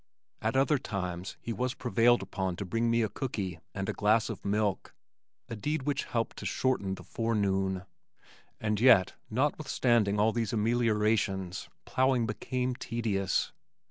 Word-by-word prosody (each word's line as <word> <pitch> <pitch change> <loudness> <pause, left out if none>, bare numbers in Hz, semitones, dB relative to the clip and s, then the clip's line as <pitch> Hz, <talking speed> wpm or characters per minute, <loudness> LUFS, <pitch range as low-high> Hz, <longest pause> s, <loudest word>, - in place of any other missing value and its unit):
At 110 +3 0
other 135 +2 +3
times 90 -6 -4
he 115 - -4
was 125 +2 -2
prevailed 120 -2 +3
upon 95 -2 -2
to 100 - -5
bring 115 +6 0
to - - +2
me 115 0 +3
a - - +1
cookie 100 -4 -4 0.2
and 95 -1 -3
a - - -1
glass 110 +2 +2
of - - -8
milk, 100 -1 -1 0.5
a 115 - -5
deed 150 +6 -2
which 140 0 -1
helped 115 -1 -2
to - - -7
shorten 100 -7 0
the - - -11
forenoon. 95 -4 0 0.8
And 105 -1 0
yet, 120 -7 +6 0.2
notwithstanding 120 -5 +1
all 110 +2 +4
these 115 -2 -2
ameliorations, 105 -4 +1 0.2
plowing 130 -2 +2
became 125 +4 -2
tedious. 110 -6 -1
110 Hz, 150 wpm, -30 LUFS, 100-120 Hz, 0.8 s, yet